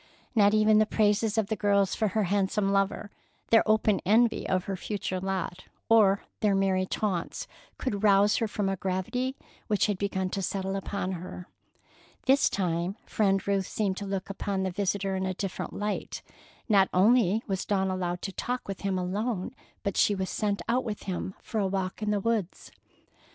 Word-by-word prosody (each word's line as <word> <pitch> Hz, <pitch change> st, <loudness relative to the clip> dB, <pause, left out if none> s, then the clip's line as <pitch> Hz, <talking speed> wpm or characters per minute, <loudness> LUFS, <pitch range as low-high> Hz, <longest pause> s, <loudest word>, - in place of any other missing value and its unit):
Not 205 Hz, -2 st, +5 dB
even 215 Hz, 0 st, +5 dB
the 215 Hz, -, +3 dB
praises 210 Hz, 0 st, +2 dB
of 220 Hz, -, +3 dB
the 220 Hz, +2 st, -2 dB
girls 200 Hz, -1 st, +2 dB
for 220 Hz, -, +1 dB
her 210 Hz, +2 st, 0 dB
handsome 195 Hz, +1 st, +1 dB
lover, 195 Hz, +1 st, 0 dB, 0.4 s
their 225 Hz, -, +7 dB
open 215 Hz, -2 st, +3 dB
envy 225 Hz, +4 st, +3 dB
of 185 Hz, -1 st, +1 dB
her 195 Hz, -, -3 dB
future 190 Hz, 0 st, -3 dB
lot, 190 Hz, -1 st, -3 dB, 0.2 s
or 205 Hz, -3 st, +5 dB, 0.2 s
their 205 Hz, -2 st, +2 dB
merry 190 Hz, -1 st, +1 dB
taunts, 190 Hz, -5 st, -2 dB, 0.3 s
could 205 Hz, -7 st, -2 dB
rouse 205 Hz, 0 st, +5 dB
her 225 Hz, -, 0 dB
from 205 Hz, -1 st, -2 dB
a 195 Hz, -, 0 dB
gravity 195 Hz, +8 st, -2 dB, 0.3 s
which 210 Hz, -3 st, +2 dB
had 205 Hz, -3 st, -1 dB
begun 190 Hz, -2 st, -1 dB
to 195 Hz, -, -2 dB
settle 195 Hz, +1 st, -2 dB
upon 195 Hz, -1 st, -3 dB
her. 180 Hz, 0 st, -7 dB, 0.8 s
This 275 Hz, +1 st, +4 dB
time 175 Hz, 0 st, -1 dB
Friend 195 Hz, -2 st, +1 dB
Ruth 195 Hz, -2 st, +1 dB
seemed 195 Hz, -3 st, -1 dB
to 200 Hz, -, -5 dB
look 195 Hz, -1 st, -3 dB
upon 195 Hz, -1 st, -2 dB
the 190 Hz, -, -1 dB
visitor 195 Hz, +1 st, -1 dB
in 190 Hz, 0 st, -1 dB
a 185 Hz, -, -2 dB
different 195 Hz, 0 st, -4 dB
light. 210 Hz, 0 st, -4 dB, 0.4 s
Not 200 Hz, -4 st, +4 dB
only 215 Hz, +1 st, +4 dB
was 190 Hz, -2 st, -2 dB
Dawn 190 Hz, -2 st, 0 dB
allowed 180 Hz, -1 st, -3 dB
to 195 Hz, -, -3 dB
talk 245 Hz, +6 st, -3 dB
with 195 Hz, -1 st, -5 dB
him 195 Hz, -2 st, -1 dB
alone, 190 Hz, +2 st, -2 dB, 0.3 s
but 200 Hz, -2 st, -2 dB
she 205 Hz, -, +4 dB
was 190 Hz, -1 st, -3 dB
sent 205 Hz, -1 st, -1 dB
out 250 Hz, +2 st, +1 dB
with 215 Hz, -3 st, -5 dB
him 190 Hz, 0 st, -4 dB
for 220 Hz, -, -3 dB
a 195 Hz, -, +1 dB
walk 190 Hz, +1 st, -3 dB
in 210 Hz, -, -1 dB
the 210 Hz, -1 st, +1 dB
woods. 215 Hz, -3 st, -2 dB
200 Hz, 185 wpm, -28 LUFS, 190-215 Hz, 0.8 s, their